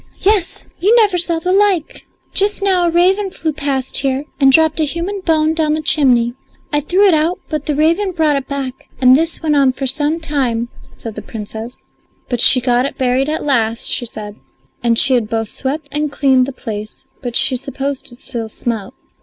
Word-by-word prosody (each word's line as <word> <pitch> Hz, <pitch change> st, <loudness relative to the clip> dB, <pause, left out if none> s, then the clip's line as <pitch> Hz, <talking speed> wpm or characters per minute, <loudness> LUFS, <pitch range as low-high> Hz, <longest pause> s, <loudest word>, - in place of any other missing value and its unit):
"Yes, 395 Hz, -3 st, +1 dB
you 415 Hz, +6 st, +3 dB
never 415 Hz, -6 st, +3 dB
saw 340 Hz, -1 st, -1 dB
the 360 Hz, +3 st, -1 dB
like! 390 Hz, -5 st, 0 dB, 0.3 s
Just 405 Hz, 0 st, +1 dB
now 370 Hz, -3 st, +2 dB
a -, -, +2 dB
raven 375 Hz, +4 st, +2 dB
flew 320 Hz, -4 st, -3 dB
past 280 Hz, -3 st, -2 dB
here 270 Hz, 0 st, -1 dB, 0.2 s
and 270 Hz, -1 st, +5 dB
dropped 320 Hz, +2 st, +3 dB
a -, -, +2 dB
human 340 Hz, +7 st, -4 dB
bone 315 Hz, -2 st, +2 dB
down 315 Hz, -2 st, 0 dB
the 310 Hz, -, -3 dB
chimney. 250 Hz, -6 st, +3 dB, 0.4 s
I 295 Hz, -, +3 dB
threw 365 Hz, +7 st, +2 dB
it 375 Hz, -, +4 dB
out, 320 Hz, +3 st, +1 dB
but 305 Hz, -2 st, -4 dB
the 300 Hz, -, 0 dB
raven 335 Hz, +7 st, +1 dB
brought 315 Hz, -4 st, +1 dB
it 275 Hz, -1 st, -3 dB
back, 270 Hz, -2 st, -6 dB
and 255 Hz, -1 st, +6 dB
this 325 Hz, +3 st, -1 dB
went 305 Hz, -2 st, +1 dB
on 275 Hz, -2 st, +3 dB
for 270 Hz, -, -5 dB
some 295 Hz, +5 st, 0 dB
time," 255 Hz, -7 st, -1 dB, 0.3 s
said 225 Hz, -, -8 dB
the -, -, -7 dB
Princess; 220 Hz, +2 st, -8 dB, 0.5 s
but 245 Hz, -2 st, -1 dB
she 255 Hz, -, +7 dB
got 245 Hz, +1 st, +1 dB
it -, -, -9 dB
buried 260 Hz, +2 st, 0 dB
at 310 Hz, -, -2 dB
last, 230 Hz, -5 st, +1 dB
she 240 Hz, -, +1 dB
said, 210 Hz, -1 st, -9 dB, 0.4 s
and 235 Hz, -1 st, +1 dB
she 270 Hz, +2 st, +7 dB
had 235 Hz, -4 st, 0 dB
both 225 Hz, -1 st, -2 dB
swept 285 Hz, +3 st, -4 dB
and 295 Hz, 0 st, -1 dB
cleaned 265 Hz, -2 st, +2 dB
the -, -, -4 dB
place, 215 Hz, -5 st, -8 dB, 0.2 s
but 245 Hz, -2 st, -5 dB
she 260 Hz, -, +5 dB
supposed 275 Hz, +1 st, -4 dB
it 240 Hz, -, -13 dB
still 235 Hz, -3 st, -6 dB
smelt. 220 Hz, -3 st, -5 dB
280 Hz, 205 wpm, -16 LUFS, 250-325 Hz, 0.5 s, she